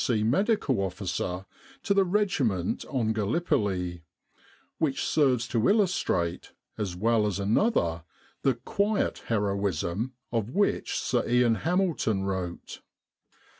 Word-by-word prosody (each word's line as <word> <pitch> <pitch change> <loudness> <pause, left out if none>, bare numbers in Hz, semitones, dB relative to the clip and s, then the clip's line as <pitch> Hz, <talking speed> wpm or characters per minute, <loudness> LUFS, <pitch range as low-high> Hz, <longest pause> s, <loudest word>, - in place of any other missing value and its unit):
C. 110 -4 +1
Medical 140 - +2
Officer 95 -1 -3 0.4
to 200 -2 +2
a - - +6
regiment 160 - 0
on 115 -6 0
Gallipoli, 100 - -1 0.8
which 150 -4 0
serves 130 -6 +2
to 115 -1 +2
illustrate 180 - +1 0.2
as 95 -5 -3
well 110 +2 +2
as 100 - -2
another 100 - +1 0.4
the 135 -3 +2
"quiet" 200 - 0
heroism 100 +1 -1 0.2
of 115 -2 -1
which 200 +10 0
Sir - - 0
Ian 120 -1 +4
Hamilton 160 - 0
wrote. 95 -3 -4
115 Hz, 110 wpm, -27 LUFS, 95-155 Hz, 0.8 s, a